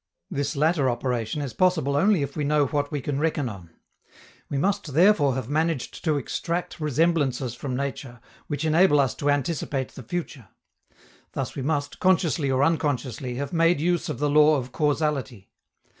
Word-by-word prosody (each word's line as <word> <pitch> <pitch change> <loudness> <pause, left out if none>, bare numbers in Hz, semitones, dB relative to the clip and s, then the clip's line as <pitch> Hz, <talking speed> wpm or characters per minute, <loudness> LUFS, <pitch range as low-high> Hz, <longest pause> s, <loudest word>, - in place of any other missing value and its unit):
This 145 -4 -2
latter 150 -2 +2
operation 120 +2 -2
is 130 -5 -5
possible 160 -3 +2
only 185 +1 +3
if 140 - -5
we 150 - -2
know 145 0 +2
what 145 +2 -2
we 145 -2 -2
can 140 +1 -2
reckon 155 -3 0
on. 95 -7 -9 0.8
We 140 - -2
must 165 -3 -1
therefore 165 -7 +4
have 130 -4 -4
managed 155 -1 -1
to 155 -3 +2
extract 170 +6 -3
resemblances 145 -5 +1
from 130 0 -5
nature, 135 -2 -5 0.3
which 145 +1 -3
enable 160 -1 +4
us 135 -4 +2
to 145 - -2
anticipate 145 -2 -1
the - - -11
future. 140 - -5 0.9
Thus - - -3
we 135 - -5
must, 145 0 -2
consciously 170 -5 +2
or 130 +1 +2
unconsciously, 135 -5 -1
have 140 +7 -4
made 165 -1 +3
use 175 +2 0
of - - -3
the 145 +3 0
law 150 +1 +5
of 125 -1 -5
causality. 145 - -1
145 Hz, 170 wpm, -25 LUFS, 135-160 Hz, 0.9 s, law